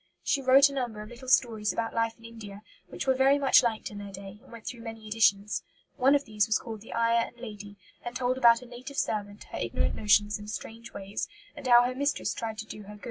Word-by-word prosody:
She 275 - +1
wrote 270 +2 +7
a 280 - -7
number 240 -6 -3
of 215 - -11
little 245 +2 -11
stories 220 -5 +3
about 225 +3 -3
life 230 0 0
in 230 - -16
India, 215 -3 -10 0.2
which - - -6
were 265 - +4
very 265 +2 +4
much 275 -2 +6
liked 225 -3 -2
in 205 - -8
their 200 -1 -8
day 195 +1 -10
and - - -19
went 230 -2 -11
through 240 -2 -6
many 225 -1 -8
editions. 210 -1 +2 0.3
One 270 +1 +4
of 285 - 0
these 215 -1 +1
was 220 - +3
called 220 -3 -8
The 225 - -8
Ayah 230 0 +2
and 245 - -16
Lady, 205 -3 -9 0.3
and 240 +1 -6
told 255 0 0
about 235 0 +6
a - - -11
native 250 +3 -10
servant, 205 -1 -2
her - - -4
ignorant - - -1
notions 210 0 +3
and 210 0 -9
strange 225 +2 -7
ways, 195 +1 -5 0.3
and 290 -3 -7
how 240 -1 +8
her 250 +1 -1
mistress 285 +3 -1
tried 225 -2 -5
to 220 - -5
do 215 - -9
her 210 +1 -11
good. - - -15
230 Hz, 245 wpm, -28 LUFS, 210-250 Hz, 0.3 s, how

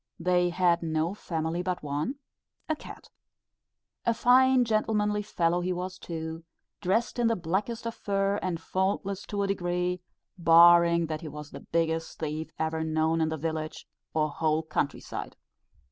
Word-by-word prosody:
They 180 -1 +2
had 175 -1 +2
no 160 +1 0
family 165 -3 -3
but 180 -2 -3
one, 150 - -2 0.5
a 315 - 0
cat. - - -12 0.9
A 235 - +2
fine 255 +1 +5
gentlemanly 210 -1 +1
fellow 175 -4 0
he 180 +1 -1
was 185 +1 -4
too; 160 -1 -5 0.4
dressed 225 +6 0
in 235 - +3
the 230 - +2
blackest 195 +7 -2
of 230 - -2
fur, 200 -1 0
and 180 -3 -2
faultless 190 +2 -2
to 200 -1 -1
a - - 0
degree, 180 -1 -1 0.4
barring 170 0 +7
that 155 0 -4
he 165 - -7
was 150 0 -8
the - - -8
biggest 165 -1 -1
thief 155 0 -3
ever 160 0 -1
known 160 +1 +1
in 160 - +2
the 160 - -3
village, 155 0 -4 0.2
or 155 -1 0
whole 155 +1 0
country 145 -2 -2
side. - - -6
175 Hz, 160 wpm, -28 LUFS, 160-195 Hz, 0.9 s, barring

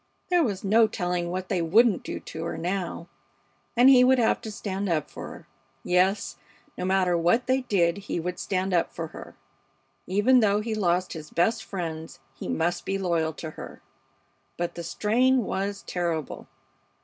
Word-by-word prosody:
There 350 -2 +4
was 200 -8 -2
no 220 +3 +5
telling 175 -3 -2
what 185 +1 -4
they 185 -3 0
wouldn't 205 +5 +4
do - - -5
to 160 - -7
her - - -4
now. 175 -1 -3 0.7
And 245 +2 +7
he 260 -2 +8
would 260 +1 +5
have 235 -2 +2
to 220 - -6
stand 200 -1 -3
up 155 -3 -1
for - - -7
her. - - -11 0.4
Yes, 180 -4 +1 0.4
no - - -4
matter 185 -2 +2
what 175 +9 +2
they 260 +1 +2
did, 185 -7 +1
he 195 -3 -4
would 180 +2 -4
stand 190 0 -1
up 170 - +2
for 165 -1 -5
her! - - -11 0.7
Even 210 +7 +4
though 205 -2 +3
he 220 +1 -3
lost 185 -3 0
his 155 -3 -8
best 220 +5 +1
friends, 160 -7 -6
he 135 - -8
must 170 +2 -1
be 195 - -1
loyal 170 -4 0
to 160 0 -7
her; - - -10 0.7
but 175 0 -2
the 170 - -6
strain 245 +8 +2
was 200 +1 -3
terrible! 170 -5 -3
185 Hz, 175 wpm, -26 LUFS, 170-215 Hz, 0.7 s, he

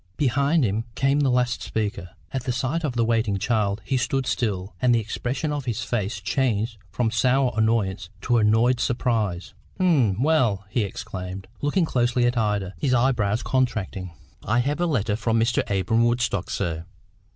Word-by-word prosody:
Behind 140 +3 +2
him 110 +2 -1
came 135 +1 +2
the 140 -2 +3
last 125 -1 +1
speaker. 105 -5 -3 0.2
At 130 -2 -3
the 130 - 0
sight 130 +7 -1
of 145 -5 -1
the 115 -1 +2
waiting 110 -3 +1
child 105 -1 0
he 135 - 0
stood 130 +1 0
still, 100 -7 -2
and 125 -1 +4
the - - +3
expression 125 +7 -3
of 145 -2 -3
his 115 -2 -2
face 105 -1 -2
changed 115 0 -1
from 115 +6 -1
sour 125 +2 +2
annoyance 110 -5 0
to 120 +1 +2
annoyed 115 +4 +3
surprise. 110 -7 -1 0.3
"Eh? 145 - +3
Well?" 125 -8 +2
he 120 - +1
exclaimed, 95 -2 -5
looking 155 +5 +2
closely 120 -3 +1
at 120 +1 +1
Ida, 105 -4 0
his 130 -4 +2
eye 130 +2 +4
brows 105 -2 0
contracting. 110 -8 -1 0.3
"I 115 +3 +1
have 145 +6 -1
a 175 - +2
letter 110 -9 0
for 115 +1 -1
Mr. 115 +1 +2
Abra'm 100 +4 +2
Woodstock, 120 -6 0
sir." 80 -1 -2
115 Hz, 175 wpm, -24 LUFS, 105-130 Hz, 0.3 s, and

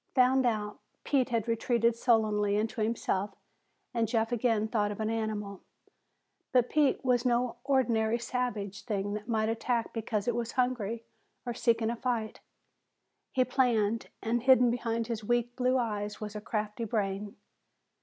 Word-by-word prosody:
Found 255 0 +4
out, 210 -2 -2 0.2
Pete 265 -3 +1
had 230 -2 -1
retreated 230 0 +2
sullenly 215 -4 +2
into 220 +2 -1
himself 205 -3 -1 0.6
and 230 -2 +1
Jeff 225 0 0
again 225 -2 +1
thought 210 -2 0
of 205 - -7
an 220 0 -1
animal. 210 -3 -3 0.9
But 250 -2 +3
Pete 290 -3 +2
was 245 -2 +3
no 245 -1 +1
ordinary 235 -5 +2
savage 235 -5 -3
thing 205 -3 -2
that 210 +1 -5
might 220 -2 +1
attack 230 +1 -1
because 220 -2 -2
it 240 - +2
was 235 0 -3
hungry 235 -3 -1 0.4
or 240 - -2
seeking 230 -1 +1
a - - -2
fight. 235 -3 -2 0.9
He 255 -2 +2
planned, 230 -4 +1 0.2
and 235 +1 0
hidden 250 -1 +5
behind 230 -1 -1
his 225 -2 -4
weak 240 +2 0
blue 255 0 +2
eyes 210 -4 -2
was 215 0 -6
a 210 - -4
crafty 215 +1 -3
brain. 205 -1 -2
230 Hz, 155 wpm, -30 LUFS, 215-245 Hz, 0.9 s, hidden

